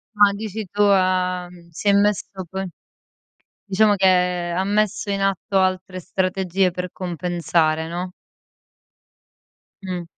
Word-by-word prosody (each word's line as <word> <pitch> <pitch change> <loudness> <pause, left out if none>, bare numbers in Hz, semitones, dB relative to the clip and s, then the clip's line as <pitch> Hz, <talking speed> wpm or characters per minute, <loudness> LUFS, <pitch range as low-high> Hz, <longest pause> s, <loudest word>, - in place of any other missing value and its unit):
Ah, 205 -1 +6
dici 215 +1 -5
tu 205 - -1
ah 185 -2 +2
mhmm, 175 -1 -16
si 185 +5 -5
è - - +7
messo 200 -1 0
con 190 0 -4 1.0
diciamo 205 +1 +3
che 180 -2 +2
ha 185 - +1
messo 210 0 0
in 200 0 -1
atto 195 0 0
altre 185 0 0
strategie 185 0 0
per 180 0 -5
compensare, 170 -3 -1
no? 180 +2 -4 1.7
Mh. 180 -2 -4
185 Hz, 125 wpm, -22 LUFS, 180-200 Hz, 1.7 s, è